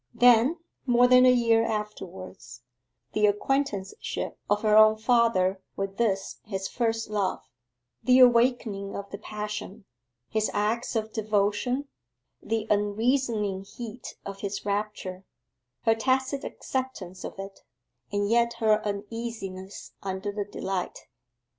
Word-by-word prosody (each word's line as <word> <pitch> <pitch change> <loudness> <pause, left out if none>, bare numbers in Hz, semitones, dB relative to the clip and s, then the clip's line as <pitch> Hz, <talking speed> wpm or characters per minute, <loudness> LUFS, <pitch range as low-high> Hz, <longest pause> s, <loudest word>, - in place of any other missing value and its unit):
Then, 245 +6 +5 0.3
more 245 0 +5
than 250 0 +7
a - - +8
year 230 -2 +4
afterwards, 190 - -6 0.5
the 210 0 +4
acquaintanceship 210 - -1
of 205 +1 +1
her 215 -1 +4
own 215 0 +7
father 220 -5 +2
with 195 0 -4
this 195 -5 0
his 195 -2 -4
first 225 -2 -1
love; 200 -3 -1 0.6
the 255 0 +5
awakening 235 -5 +4
of 200 0 -6
the 200 - -6
passion, 210 -1 -6 0.4
his 220 -1 0
acts 220 +4 0
of 220 -1 -2
devotion, 215 +5 0 0.5
the 225 -1 -1
unreasoning 210 -1 +1
heat 225 +3 -8
of 195 0 -6
his 200 -1 -4
rapture, 200 -2 -3 0.6
her 225 - +5
tacit 265 +4 0
acceptance 205 -9 -5
of - - -7
it, 195 0 -8 0.5
and 205 0 0
yet 235 +2 +3
her 220 -2 +2
uneasiness 205 -2 -5
under 190 +1 -3
the 205 0 -3
delight. 190 -2 -4
215 Hz, 120 wpm, -27 LUFS, 200-235 Hz, 0.6 s, a